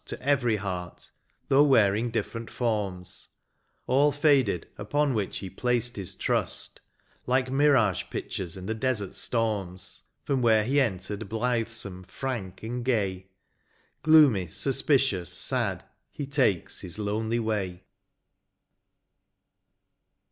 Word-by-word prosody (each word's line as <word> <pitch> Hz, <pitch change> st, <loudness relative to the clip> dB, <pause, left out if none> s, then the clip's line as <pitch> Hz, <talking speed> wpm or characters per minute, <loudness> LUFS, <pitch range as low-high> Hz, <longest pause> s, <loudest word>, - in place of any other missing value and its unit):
To -, -, -6 dB
every 130 Hz, -5 st, +2 dB
heart, 90 Hz, -3 st, -5 dB, 0.4 s
though 135 Hz, +1 st, +5 dB
wearing 115 Hz, -5 st, +4 dB
diflferent 115 Hz, 0 st, -3 dB
forms; 100 Hz, -7 st, -3 dB, 0.6 s
All 140 Hz, +3 st, +4 dB
faded 140 Hz, -, +2 dB
upon 140 Hz, +7 st, 0 dB
which 105 Hz, -4 st, -2 dB
he 95 Hz, -, -5 dB
placed 120 Hz, +2 st, 0 dB
his 95 Hz, -4 st, -5 dB
trust. -, -, -2 dB, 0.5 s
Like 130 Hz, 0 st, +1 dB
mirage 135 Hz, -, +3 dB
pictures 90 Hz, -1 st, -5 dB
in 95 Hz, -, -8 dB
the 110 Hz, -, -1 dB
desert 110 Hz, -4 st, -1 dB
storms. 105 Hz, -6 st, -2 dB, 0.2 s
From 135 Hz, -2 st, 0 dB
where 110 Hz, -3 st, +4 dB
he 140 Hz, +6 st, +2 dB
entered 100 Hz, -2 st, -2 dB
blithesome, 115 Hz, -4 st, -2 dB
frank, 110 Hz, -9 st, -5 dB
and 120 Hz, +2 st, -3 dB
gay. 100 Hz, -7 st, 0 dB, 0.8 s
Gloomy^ 140 Hz, -, +6 dB
suspicious, 135 Hz, -, +1 dB
sad, -, -, -1 dB, 0.3 s
he 145 Hz, -, -5 dB
takes 130 Hz, -, +1 dB
his 90 Hz, +1 st, -7 dB
lonely 110 Hz, +2 st, -1 dB
way. 100 Hz, -6 st, -2 dB
110 Hz, 110 wpm, -27 LUFS, 100-130 Hz, 0.8 s, Gloomy^